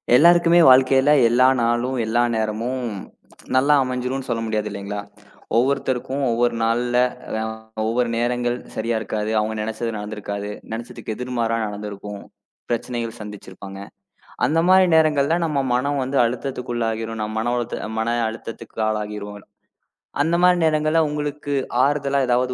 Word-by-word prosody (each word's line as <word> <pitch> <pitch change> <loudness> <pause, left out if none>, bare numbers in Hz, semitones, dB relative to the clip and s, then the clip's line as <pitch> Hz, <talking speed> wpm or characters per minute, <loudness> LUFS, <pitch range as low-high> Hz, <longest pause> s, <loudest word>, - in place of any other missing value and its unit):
எல்லாருக்குமே 170 +3 +6
வாழ்க்கையில 130 +2 +5 0.2
எல்லா 125 +2 +5 0.2
நாளும் 120 +2 0
எல்லா 120 +2 +2
நேரமும் 115 +3 -2 0.7
நல்லா 140 +3 +4
அமைஞ்சிரும்னு 130 +1 -3
சொல்ல 115 -1 -1
முடியாது 110 -1 -1
இல்லீங்களா? 100 0 -5 0.6
ஒவ்வொருத்தருக்கும் 130 +1 0
ஒவ்வொரு 120 +1 +1
நாள்ல 120 +2 +1 0.4
அ - - -1 0.5
ஒவ்வொரு 120 +1 +1
நேரங்கள் 120 0 0 0.2
சரியா 115 +1 -1
இருக்காது. 105 0 -3
அவங்க 110 +1 -1
நினைச்சது 110 +1 -3
நடந்திருக்காது. 105 -1 -5 0.2
நினைச்சதுக்கு 115 -1 -6
எதிர்மாறா 120 -2 -1
நடந்திருக்கும். 105 0 -7 0.5
பிரச்சனைகள் 120 -1 -3
சந்திச்சிருப்பாங்க. 100 -1 -9 0.7
அந்த 160 +4 +2
மாரி 185 0 +6
நேரங்கள்ல 155 0 +3
நம்ம 150 -4 0
மனம் 140 +3 0
வந்து 135 +2 -2
அழுத்தத்துக்குள்ளாகிரும். 115 -3 -3
நம்ம 110 0 -4
மன 120 +1 0
உளத் 120 -1 -3 0.2
மன 115 +1 0
அழுத்தத்துக்கு 110 0 -9
ஆளாகிருவோம். 105 -1 -4 0.8
அந்த 165 +3 +1
மாரி 180 0 +5
நேரங்கள்ல 155 +1 +2
உங்களுக்கு 150 -1 -3 0.3
ஆறுதலா 140 -1 +1
ஏதாவது 125 +1 +1
120 Hz, 125 wpm, -22 LUFS, 110-135 Hz, 0.8 s, எல்லாருக்குமே